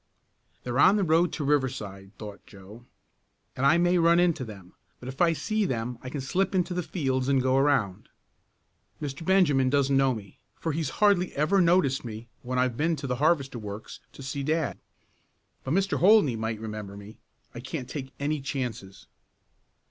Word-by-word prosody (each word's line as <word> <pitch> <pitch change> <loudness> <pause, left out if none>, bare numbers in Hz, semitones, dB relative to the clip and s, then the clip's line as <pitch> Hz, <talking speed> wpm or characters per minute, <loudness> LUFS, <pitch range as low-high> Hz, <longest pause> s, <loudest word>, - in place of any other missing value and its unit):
"They're 125 +2 -2
on 190 +7 +6
the 205 - +1
road 165 +1 +3
to 150 - -3
Riverside," 110 -9 -2
thought 105 -2 -10
Joe, 105 +4 -14 0.7
"and 135 +2 +2
I 160 +4 +5
may 175 +1 +3
run 170 +1 +4
into 170 -6 +2
them, 100 -6 -11 0.3
but 125 - -10
if 130 +4 -6
I 170 -1 +4
see 215 +9 -1
them 120 - -3
I 130 - -7
can 140 +1 -4
slip 185 +9 -1
into 180 -1 0
the 180 - -1
fields 130 -7 -2
and 135 -1 +3
go 130 0 +1
around. 135 -9 +1 0.9
Mr. 145 +1 -5
Benjamin 160 -8 +3
doesn't 140 0 +2
know 135 -2 +3
me, 100 -4 -11 0.2
for 165 - -3
he's 155 -2 -2 0.2
hardly 185 -3 +3
ever 170 +7 +2
noticed 170 -6 +3
me 115 -1 -8
when 125 +1 -4
I've 125 -1 +1
been 165 +2 +1
to 140 -1 -7
the 125 -2 -2
Harvester 140 -4 +1
works 105 0 -8
to 135 - -11
see 135 +2 -4
dad. 155 -1 -1 0.8
But 135 - -1
Mr. 195 +1 +1
Holdney 190 - +5
might 110 0 -3
remember 105 -2 -7
me. 100 +2 -12 0.3
I 120 - -7
can't 130 +1 -6
take 135 -1 -6
any 145 +1 -1
chances." 120 -8 -5
135 Hz, 180 wpm, -27 LUFS, 120-165 Hz, 0.9 s, on